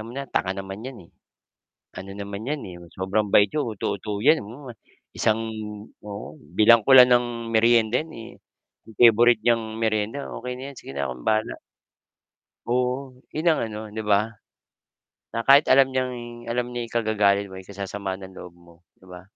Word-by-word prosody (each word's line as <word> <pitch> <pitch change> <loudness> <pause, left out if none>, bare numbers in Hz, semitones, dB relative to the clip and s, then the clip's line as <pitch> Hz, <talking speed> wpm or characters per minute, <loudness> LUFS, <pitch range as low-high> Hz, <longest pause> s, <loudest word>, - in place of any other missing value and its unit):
"'Yaan 110 - -8
mo - - -9
na, 140 +1 -5
tanga 95 - -1
naman 95 +2 -7
yan 130 -2 -8
eh. - - -29 0.9
Ano 95 +1 -8
naman 100 +1 -7
'yan 145 +2 -3
eh, 90 - -9 0.2
sobrang 100 +2 -1
bait 100 -1 +6
yan, 150 - 0
uto-uto 105 -2 -4
yan, 150 +5 +4
hmm, 125 +6 -11 0.5
isang 110 0 +1 0.6
oo, 100 -7 -8 0.2
bilhan 115 +1 +7
ko 135 - +4
lang 125 0 +9
ng 120 -1 +1
merienda 115 +2 +3
eh, 120 -7 -11 0.5
yung 110 - -16
favorite 120 -1 +6
niyang 110 -1 0
merienda 110 +4 -1
okey 125 +1 -5
na - - -9
'yan 135 - -20
sige - - -10
na 70 -1 -3
akong 65 -1 -8
bahala." 110 0 0 1.1
Oo, 125 +2 -1 0.2
'yon 155 +3 -3
ang 160 - +4
ano 105 - -6
'di 110 +1 -6
ba? 105 +1 +1 1.0
Na 115 0 -4
kahit 140 +2 +6
alam 135 0 +6
niyang 120 -2 -4
alam 120 +1 -1
niya 120 -1 -3
ikagagalit 105 -3 +1
mo, 95 -1 -11
ikasasama 100 0 -6
ng 95 -1 -11
loob 90 -2 -11
mo 85 -1 -19 0.2
'di 95 - -21
ba 90 -1 -11
110 Hz, 175 wpm, -24 LUFS, 100-120 Hz, 1.1 s, lang